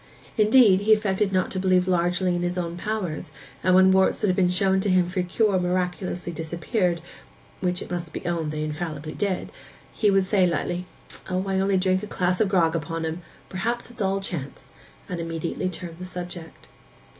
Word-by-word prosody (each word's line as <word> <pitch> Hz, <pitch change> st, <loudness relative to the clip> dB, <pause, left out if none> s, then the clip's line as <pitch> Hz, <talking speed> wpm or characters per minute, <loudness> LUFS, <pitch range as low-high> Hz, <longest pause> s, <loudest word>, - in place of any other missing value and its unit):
Indeed, 215 Hz, -3 st, +6 dB
he 215 Hz, +1 st, +5 dB
affected 210 Hz, -1 st, +1 dB
not 185 Hz, -1 st, +1 dB
to 190 Hz, -, -2 dB
believe 185 Hz, -1 st, +3 dB
largely 180 Hz, 0 st, +1 dB
in 175 Hz, -, -1 dB
his 175 Hz, +1 st, -2 dB
own 170 Hz, -1 st, -2 dB
powers, 180 Hz, -4 st, -3 dB, 0.3 s
and 185 Hz, 0 st, +4 dB
when 190 Hz, 0 st, +7 dB
warts 190 Hz, 0 st, +4 dB
that -, -, -1 dB
had 185 Hz, -3 st, +2 dB
been 180 Hz, -2 st, +3 dB
shown 190 Hz, +1 st, +2 dB
him 185 Hz, -3 st, +3 dB
for 185 Hz, +1 st, -1 dB
cure 190 Hz, +2 st, +1 dB
miraculously 180 Hz, 0 st, -2 dB
disappeared—which 175 Hz, +1 st, -3 dB
it -, -, -11 dB
must 175 Hz, -2 st, -4 dB
be -, -, -7 dB
owned 165 Hz, -3 st, -1 dB
they 155 Hz, 0 st, -3 dB
infallibly 155 Hz, -1 st, -4 dB
did—he 205 Hz, +2 st, -3 dB
would 195 Hz, -1 st, +4 dB
say 190 Hz, -2 st, +3 dB
lightly, 175 Hz, +2 st, -2 dB, 0.4 s
'O, 185 Hz, +1 st, -1 dB
I 190 Hz, 0 st, +1 dB
only 195 Hz, 0 st, +2 dB
drink 185 Hz, 0 st, +2 dB
a 210 Hz, -, -6 dB
glass 180 Hz, -1 st, 0 dB
of 210 Hz, -, +3 dB
grog 170 Hz, -4 st, +3 dB
upon 165 Hz, 0 st, -3 dB
'em—perhaps 185 Hz, +8 st, -5 dB
it's 240 Hz, -, -9 dB
all 195 Hz, 0 st, +1 dB
chance,' 170 Hz, -8 st, -6 dB, 0.4 s
and 180 Hz, -, -4 dB
immediately 165 Hz, +2 st, -3 dB
turn 175 Hz, -1 st, -7 dB
the 180 Hz, -, -6 dB
subject. 175 Hz, -2 st, -8 dB
180 Hz, 180 wpm, -25 LUFS, 175-190 Hz, 0.4 s, when